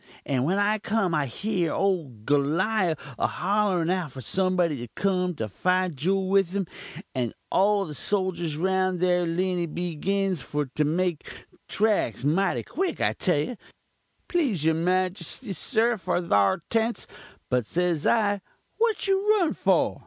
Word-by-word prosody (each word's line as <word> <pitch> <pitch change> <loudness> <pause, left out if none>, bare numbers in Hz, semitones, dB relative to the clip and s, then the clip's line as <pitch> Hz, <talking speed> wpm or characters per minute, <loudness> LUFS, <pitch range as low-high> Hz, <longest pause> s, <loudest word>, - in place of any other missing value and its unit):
And 130 -2 0
when 185 +6 +1
I 210 +1 +2
cum 200 -4 0
I 150 -3 +1
hear 180 - -1
ole 185 -7 0 0.2
Golliawh 165 +5 +2 0.2
a - - +2
hollerin 190 -3 +1
out 180 -6 -1
for 130 - -9
somebody 180 - +1
to 120 0 -6
cum 180 -3 0
and 110 -2 -3
fite 185 - +1
juul 190 +7 0
with 195 -1 +2
um; 200 -2 0 0.5
and 125 -4 -2 0.2
all 200 +1 +3
the 155 - -7
soljurs 175 -1 -1
round 185 0 +1
thar 180 -1 +2
they 175 +1 0
begins 180 +2 -1
for 150 0 -2
to 150 - +1
make 170 +1 -1 0.4
traks 200 - +1
mighty 185 +7 +1
quick, 375 +2 -2
I - - +2
tell 180 -6 +1
you, 235 +10 -4 0.7
please 255 - 0
your 160 - +4
majuste, 185 +5 -1
sir, 230 - +1
for 185 - -1
thar 170 - +2
tents; 230 +1 0 0.5
but, 125 -3 +1
says 175 -3 0
I, 205 -3 +2 0.4
what 450 -3 +1
you 400 +2 +3
run 350 -6 +1
for? - - +1
185 Hz, 155 wpm, -26 LUFS, 160-200 Hz, 0.7 s, your